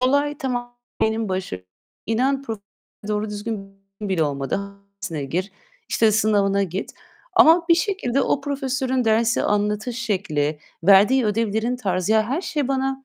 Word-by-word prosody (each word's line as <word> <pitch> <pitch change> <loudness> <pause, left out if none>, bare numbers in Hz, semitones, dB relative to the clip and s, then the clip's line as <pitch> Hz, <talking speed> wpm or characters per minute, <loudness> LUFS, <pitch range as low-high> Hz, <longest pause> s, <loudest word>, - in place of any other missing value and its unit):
Olay 285 +3 +1
tamam 245 -3 -4 0.2
benim 220 -1 +1
baş 185 - -3 0.5
inan 265 +5 +1
pro 225 -5 -5 0.5
doğru 210 0 -1
düzgün 205 -2 -5 0.3
bile 190 -5 0
olmadı. 140 +3 -1 0.4
Dersine 160 -8 -3
gir, 180 +8 -3 0.4
işte 220 -1 +3
sınavına 200 -2 +2
git. 190 +1 -4 0.4
Ama 330 +2 +6
bir 335 - +7
şekilde 330 - 0
o 285 - +1
profesörün 265 -2 -1
dersi 225 +1 +2
anlatış 210 +3 0
şekli, 160 -10 -1 0.3
verdiği 205 +7 +6
ödevlerin 220 +3 0
tarzı, 190 -4 0
ya, 220 0 +4
her 270 +9 -1
şey 300 -7 -2
bana, 270 0 -1
220 Hz, 140 wpm, -22 LUFS, 200-265 Hz, 0.5 s, bir